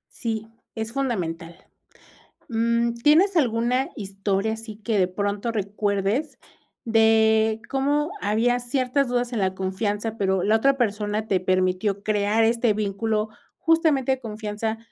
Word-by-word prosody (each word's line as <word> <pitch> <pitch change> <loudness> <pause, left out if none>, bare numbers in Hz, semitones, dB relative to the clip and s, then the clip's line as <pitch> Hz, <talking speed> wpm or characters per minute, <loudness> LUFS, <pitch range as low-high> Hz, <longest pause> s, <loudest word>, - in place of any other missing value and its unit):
Sí, 225 -2 -3 0.3
es 225 0 -4
fundamental. 175 -11 -3 0.9
Mm, 235 0 +1
¿tienes 315 +11 +4
alguna 250 -1 +1
historia 200 +1 -2
así 225 -1 -6
que 215 0 -1
de 185 - +4
pronto 200 +4 -2
recuerdes 205 +5 -1 0.5
de 220 -1 +3
cómo 290 +3 0
había 235 +4 +2
ciertas 255 +2 0
dudas 245 0 -1
en 225 - -1
la 190 -1 0
confianza, 205 +3 -2
pero 190 -3 +1
la 215 +2 +4
otra 275 +4 +2
persona 210 -2 -1
te 190 -2 +2
permitió 185 +2 0
crear 210 +1 +1
este 230 0 +2
vínculo 215 +1 -1 0.3
justamente 320 -6 +2
de 265 - -2
confianza, 220 -1 -4
220 Hz, 130 wpm, -24 LUFS, 205-240 Hz, 0.9 s, tienes